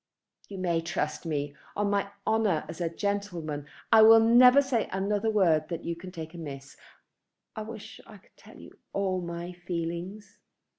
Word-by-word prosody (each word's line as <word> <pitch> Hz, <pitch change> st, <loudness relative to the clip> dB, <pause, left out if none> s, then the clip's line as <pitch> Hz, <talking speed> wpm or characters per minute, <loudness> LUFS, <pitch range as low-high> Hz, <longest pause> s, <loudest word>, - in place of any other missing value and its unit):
"You 200 Hz, -, -7 dB
may 170 Hz, -3 st, 0 dB
trust 160 Hz, 0 st, -3 dB
me. 145 Hz, -2 st, -3 dB, 0.2 s
On 205 Hz, 0 st, 0 dB
my 200 Hz, -1 st, 0 dB, 0.2 s
honour 220 Hz, -7 st, +1 dB
as 170 Hz, -, -8 dB
a 170 Hz, -, 0 dB
gentleman, 170 Hz, -6 st, -3 dB, 0.3 s
I 220 Hz, -, +8 dB
will 225 Hz, +1 st, +9 dB
never 245 Hz, +4 st, +7 dB
say 265 Hz, -5 st, 0 dB
another 205 Hz, +3 st, 0 dB
word 170 Hz, -8 st, +3 dB
that 170 Hz, -, -5 dB
you 170 Hz, -, -2 dB
can 180 Hz, +2 st, -10 dB
take 160 Hz, -2 st, -8 dB
amiss. 140 Hz, -5 st, -8 dB, 0.8 s
I 220 Hz, -, -4 dB
wish 220 Hz, 0 st, -9 dB
I 215 Hz, -, -12 dB
could -, -, -27 dB
tell -, -, -16 dB
you -, -, -14 dB
all 190 Hz, -2 st, -1 dB
my 170 Hz, 0 st, -5 dB
feelings. 175 Hz, +3 st, -6 dB
185 Hz, 165 wpm, -28 LUFS, 165-210 Hz, 0.8 s, will